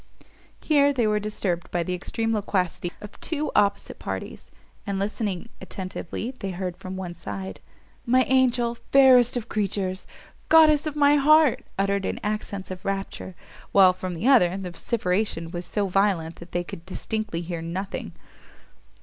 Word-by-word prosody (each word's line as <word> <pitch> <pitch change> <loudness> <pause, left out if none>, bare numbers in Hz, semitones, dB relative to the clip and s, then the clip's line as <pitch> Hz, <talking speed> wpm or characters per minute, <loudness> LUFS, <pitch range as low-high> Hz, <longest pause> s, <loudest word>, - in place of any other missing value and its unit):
Here 285 -2 +3
they 250 -5 +1
were 210 0 +2
disturbed 200 -4 -2
by 175 -1 -1
the 180 - -3
extreme 225 +5 -2
loquacity 185 -4 -1
of 210 - -11
two 305 -2 -2
opposite 200 -1 +1
parties: - - -6 0.4
and 200 -1 -1
listening 205 0 -3
attentively, 190 +4 -5
they 195 - -3
heard 180 -1 -4
from 185 +1 -7
one 180 -2 -5
side, 100 - -7 0.4
"My 255 +2 +4
angel! 250 -2 +2 0.2
fairest 255 -3 +6
of 240 -1 -4
creatures! 195 -3 -2 0.4
goddess 310 -2 +6
of 305 - -4
my 290 0 +5
heart!" 305 -1 +5
uttered 200 0 +1
in - - -2
accents 205 -2 -3
of 185 0 -7
rapture; 195 -1 -4 0.4
while 190 -2 +7
from 185 -1 -5
the 195 +9 -2
other, 190 -9 +5
the 185 -2 -5
vociferation 180 -4 -1
was 175 -1 -5
so 205 -2 -1
violent 185 -4 +1
they 175 - -1
could 165 -1 -9
distinctly 210 0 -3
hear 170 -1 -5
nothing. 170 - -5
195 Hz, 150 wpm, -25 LUFS, 180-235 Hz, 0.4 s, while